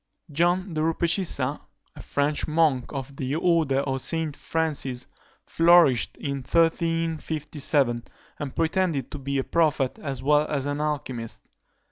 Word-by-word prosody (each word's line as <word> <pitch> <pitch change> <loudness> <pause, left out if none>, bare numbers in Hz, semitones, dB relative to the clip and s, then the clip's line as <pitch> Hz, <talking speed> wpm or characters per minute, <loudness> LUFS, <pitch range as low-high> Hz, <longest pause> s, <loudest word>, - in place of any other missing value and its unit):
John 175 +4 +1
de 155 - -1
Rupecissa, 165 -4 0 0.3
a - - -9
French 145 +1 -1
monk 155 -5 +1
of 135 -1 -6
the 135 +2 -2
order 160 -5 +2
of 135 -2 -2
St. 160 -3 -1
Francis, 145 -7 -2 0.4
flourished 165 -8 +4
in 140 -1 -3
1357, 155 -4 0 0.3
and 145 -3 -5
pretended 165 -3 0
to 145 - -6
be 140 +1 -2
a 135 - +1
prophet 150 -5 +1
as 135 -4 -5
well 150 +2 +3
as 140 -3 -2
an 145 0 -2
alchymist. 130 -6 -4
150 Hz, 130 wpm, -25 LUFS, 135-165 Hz, 0.4 s, flourished